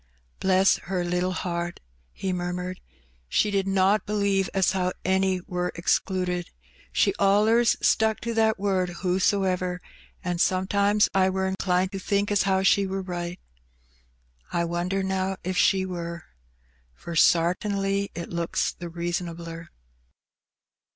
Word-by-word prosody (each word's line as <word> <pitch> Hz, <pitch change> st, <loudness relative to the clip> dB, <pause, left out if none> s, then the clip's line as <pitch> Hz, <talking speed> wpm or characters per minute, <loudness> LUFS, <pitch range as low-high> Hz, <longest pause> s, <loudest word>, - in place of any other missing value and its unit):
"Bless 190 Hz, 0 st, +4 dB
her 185 Hz, -2 st, 0 dB
little 180 Hz, +1 st, 0 dB
heart!'' 175 Hz, -1 st, -3 dB, 0.3 s
he 190 Hz, -1 st, -3 dB
murmured; 180 Hz, +1 st, -4 dB, 0.5 s
"she 210 Hz, -, +2 dB
did 195 Hz, -1 st, 0 dB
not 195 Hz, +1 st, +2 dB
believe 200 Hz, -2 st, +1 dB
as 190 Hz, -1 st, +2 dB
how 185 Hz, -1 st, 0 dB
any 190 Hz, -1 st, +1 dB
wur 180 Hz, -1 st, -3 dB
excluded; 180 Hz, 0 st, 0 dB, 0.4 s
she -, -, +2 dB
allers 215 Hz, +4 st, +4 dB
stuck 220 Hz, -1 st, +3 dB
to 235 Hz, 0 st, -3 dB
that 220 Hz, -1 st, +2 dB
word 190 Hz, -2 st, 0 dB
'whosoever,' 185 Hz, -1 st, +1 dB, 0.4 s
an' 175 Hz, -1 st, -2 dB
sometimes 200 Hz, +3 st, +2 dB
I 190 Hz, -1 st, +3 dB
wur 190 Hz, 0 st, -1 dB
inclined 190 Hz, -1 st, 0 dB
to 195 Hz, -, -4 dB
think 200 Hz, +2 st, 0 dB
as 205 Hz, -, +3 dB
how 190 Hz, 0 st, +2 dB
she 195 Hz, 0 st, +4 dB
wur 190 Hz, 0 st, -3 dB
right. 175 Hz, -1 st, -5 dB, 1.1 s
I 170 Hz, 0 st, 0 dB
wonder, 175 Hz, +3 st, -1 dB
now, 190 Hz, 0 st, -1 dB
if 185 Hz, +1 st, -2 dB
she 190 Hz, 0 st, +3 dB
wur? 170 Hz, -2 st, -5 dB, 0.7 s
for 170 Hz, -, -8 dB
sartinly 195 Hz, +5 st, +2 dB
it 170 Hz, 0 st, -6 dB
looks 170 Hz, -1 st, -1 dB
the 175 Hz, -1 st, -8 dB
reasonabler. 170 Hz, -1 st, -5 dB
185 Hz, 130 wpm, -25 LUFS, 180-195 Hz, 1.1 s, Bless